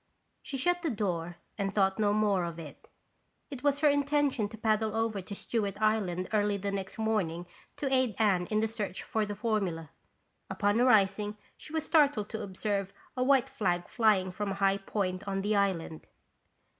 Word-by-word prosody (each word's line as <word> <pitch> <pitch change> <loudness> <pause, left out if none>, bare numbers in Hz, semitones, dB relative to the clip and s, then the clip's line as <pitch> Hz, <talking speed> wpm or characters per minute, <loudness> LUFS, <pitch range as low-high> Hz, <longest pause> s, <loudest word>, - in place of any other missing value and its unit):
She 275 - -5
shut 355 +7 +1
the 330 - -1
door 175 -7 -2 0.2
and 195 -1 0
thought 195 0 +1
no 205 -1 +3
more 205 -3 +2
of 170 -1 -4
it. 155 -4 -11 0.6
It 270 -3 -6
was 285 0 +1
her 305 - +5
intention 285 -6 +2
to 220 - -10
paddle 220 0 +1
over 225 -3 0
to 200 +2 -8
Stewart 205 -2 -2
Island 200 -5 +1
early 205 -1 +2
the 200 +1 -3
next 195 -1 -4
morning 200 -7 -1 0.3
to 270 -2 -1
aid 255 -5 +2
Anne 190 -5 +2
in 215 0 +1
the 220 - +2
search 210 -4 -4
for 220 -1 -1
the 205 - -4
formula. 195 - -2 0.6
Upon 205 +3 +1
arising, 210 -3 +3 0.2
she - - -11
was 315 -1 -2
startled 285 -11 +3
to 220 - -4
observe 200 0 -2 0.2
a 255 - +1
white 270 0 +4
flag 185 -10 -1
flying 210 -6 +2
from 205 +2 -3
a 195 - -2
high 195 0 +2
point 195 -1 -3
on 195 0 -1
the 210 +1 +1
island. 185 -5 -1
210 Hz, 180 wpm, -30 LUFS, 195-225 Hz, 0.6 s, her